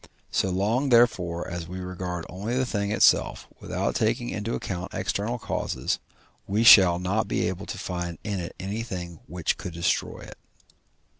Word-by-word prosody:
So 95 Hz, -, +1 dB
long 110 Hz, +9 st, +1 dB
therefore 105 Hz, -8 st, +3 dB
as 85 Hz, -1 st, -5 dB
we 90 Hz, +2 st, -6 dB
regard 90 Hz, -2 st, -5 dB
only 105 Hz, +7 st, -3 dB
the 130 Hz, -, +2 dB
thing 100 Hz, -4 st, -2 dB
itself, -, -, +3 dB
without -, -, -2 dB
taking 120 Hz, +2 st, 0 dB
into 110 Hz, +2 st, -3 dB
account 90 Hz, -1 st, -5 dB
external 110 Hz, +5 st, -1 dB
causes, 110 Hz, -, -2 dB, 0.5 s
we 105 Hz, +4 st, +1 dB
shall 95 Hz, -6 st, +9 dB
not 95 Hz, +5 st, 0 dB
be -, -, 0 dB
able 95 Hz, +2 st, -4 dB
to -, -, -5 dB
find 90 Hz, -3 st, -4 dB
in 100 Hz, -3 st, -2 dB
it 85 Hz, -, -6 dB
anything 95 Hz, -4 st, -5 dB
which 85 Hz, 0 st, -1 dB
could 90 Hz, -, -6 dB
destroy 85 Hz, +1 st, -1 dB
it. -, -, -11 dB
95 Hz, 160 wpm, -26 LUFS, 90-110 Hz, 0.5 s, shall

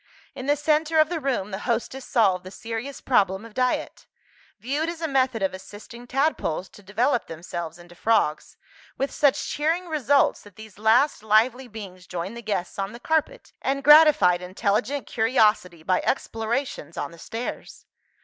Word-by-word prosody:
In 255 Hz, -, -7 dB
the 290 Hz, -, +4 dB
centre 310 Hz, +2 st, +1 dB
of 310 Hz, 0 st, +5 dB
the 345 Hz, -2 st, -2 dB
room, 255 Hz, -8 st, -2 dB
the 190 Hz, -, -4 dB
hostess 245 Hz, +3 st, -2 dB
solved 195 Hz, -8 st, +2 dB
the 185 Hz, -, -9 dB
serious 230 Hz, +6 st, -6 dB
problem 195 Hz, -4 st, +1 dB
of 230 Hz, -, -13 dB
diet; 255 Hz, +1 st, -1 dB, 0.5 s
viewed 290 Hz, +7 st, -2 dB
as 335 Hz, -1 st, -6 dB
a 325 Hz, -, -2 dB
method 260 Hz, -6 st, +1 dB
of 190 Hz, -, 0 dB
assisting 210 Hz, +5 st, -11 dB
tadpoles 260 Hz, -, -1 dB
to -, -, -16 dB
develop 225 Hz, +6 st, 0 dB
themselves 165 Hz, 0 st, -6 dB
into 175 Hz, 0 st, -15 dB
frogs 175 Hz, -6 st, 0 dB, 0.4 s
with 275 Hz, +1 st, -1 dB
such 285 Hz, -2 st, +2 dB
cheering 325 Hz, +5 st, 0 dB
results 285 Hz, -3 st, +2 dB
that 205 Hz, -3 st, -16 dB
these 215 Hz, -2 st, -13 dB
last 225 Hz, +6 st, +3 dB
lively 225 Hz, +4 st, +2 dB
beings 195 Hz, -5 st, -10 dB
joined 180 Hz, +5 st, -5 dB
the 235 Hz, -, -7 dB
guests 200 Hz, -4 st, -3 dB
on 195 Hz, +2 st, -3 dB
the 235 Hz, -, -9 dB
carpet, 320 Hz, -, -1 dB
and 275 Hz, +1 st, -1 dB
gratified 295 Hz, -, +7 dB
intelligent 210 Hz, +9 st, -1 dB
curiosity 215 Hz, -7 st, +1 dB
by 185 Hz, +2 st, +1 dB
explorations 225 Hz, -, -2 dB
on -, -, -3 dB
the 170 Hz, -, -14 dB
stairs. 230 Hz, +7 st, -7 dB
230 Hz, 165 wpm, -24 LUFS, 195-275 Hz, 0.5 s, gratified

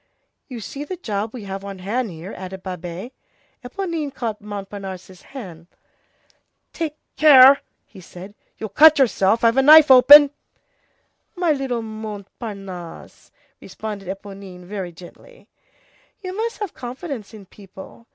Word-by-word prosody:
"You 245 Hz, -4 st, -8 dB
see 275 Hz, +7 st, -7 dB
the 360 Hz, +5 st, -7 dB
job 215 Hz, -, -4 dB
we 240 Hz, -3 st, -9 dB
have 195 Hz, 0 st, -7 dB
on 200 Hz, -1 st, -8 dB
hand 220 Hz, +6 st, -3 dB
here," 170 Hz, +3 st, -9 dB
added 190 Hz, 0 st, -9 dB
Babet. 180 Hz, +4 st, -7 dB, 0.5 s
Éponine 320 Hz, +1 st, -4 dB
caught 225 Hz, -5 st, -5 dB
Montparnasse's 195 Hz, -3 st, -8 dB
hand. 180 Hz, -, -11 dB, 1.1 s
"Take 315 Hz, -2 st, -4 dB, 0.2 s
care," 275 Hz, -2 st, +8 dB, 0.4 s
said 185 Hz, +2 st, -12 dB
he, -, -, -43 dB
"you'll 220 Hz, -, -6 dB
cut 310 Hz, +9 st, +6 dB
yourself, 230 Hz, -5 st, +2 dB
I've 230 Hz, +2 st, +3 dB
a -, -, +6 dB
knife 300 Hz, +1 st, +8 dB
open." 285 Hz, +3 st, +9 dB, 1.0 s
"My 350 Hz, -3 st, +1 dB
little 265 Hz, -5 st, -2 dB
Montparnasse," 200 Hz, -4 st, -9 dB, 0.3 s
responded 205 Hz, -3 st, -8 dB
Éponine 195 Hz, -1 st, -9 dB
very 185 Hz, -1 st, -6 dB
gently, 180 Hz, -, -16 dB, 0.8 s
"you 370 Hz, 0 st, -6 dB
must 455 Hz, +2 st, -3 dB
have 410 Hz, -5 st, -5 dB
confidence 250 Hz, -, -8 dB
in 205 Hz, -2 st, -13 dB
people. 195 Hz, +4 st, -15 dB
215 Hz, 130 wpm, -21 LUFS, 195-275 Hz, 1.1 s, open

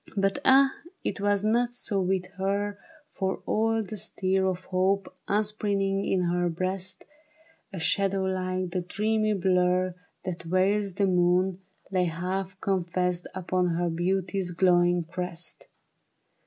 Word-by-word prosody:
But 195 Hz, 0 st, +1 dB
ah, 270 Hz, +1 st, +6 dB, 0.3 s
it 200 Hz, -, -2 dB
was 205 Hz, 0 st, +2 dB
not 240 Hz, +2 st, +2 dB
so 200 Hz, -5 st, 0 dB
with 185 Hz, 0 st, 0 dB
her; 200 Hz, +1 st, -1 dB, 0.3 s
For 190 Hz, -1 st, -2 dB
all 225 Hz, 0 st, +1 dB
the 215 Hz, +1 st, -7 dB
stir 190 Hz, 0 st, 0 dB
Of 185 Hz, 0 st, -2 dB
hope 190 Hz, +1 st, 0 dB
upspringing 200 Hz, -2 st, 0 dB
in 185 Hz, -1 st, +1 dB
her 175 Hz, 0 st, +1 dB
breast, 185 Hz, +2 st, -2 dB, 0.7 s
A 190 Hz, -, -5 dB
shadow 195 Hz, +4 st, +1 dB
like 185 Hz, -1 st, -1 dB
the 180 Hz, 0 st, -1 dB
dreamy 215 Hz, +4 st, 0 dB
blur 185 Hz, -1 st, +2 dB, 0.3 s
That 180 Hz, -2 st, -3 dB
veils 190 Hz, +3 st, +1 dB
the 200 Hz, -, +2 dB
moon, 180 Hz, 0 st, +2 dB, 0.3 s
lay 185 Hz, -2 st, +2 dB
half 185 Hz, +3 st, -3 dB
confessed 180 Hz, -1 st, 0 dB
Upon 180 Hz, -1 st, 0 dB
her 175 Hz, 0 st, 0 dB
beauty's 185 Hz, +2 st, 0 dB
glowing 175 Hz, -1 st, +3 dB
crest. 175 Hz, 0 st, -5 dB
185 Hz, 130 wpm, -27 LUFS, 180-200 Hz, 0.7 s, ah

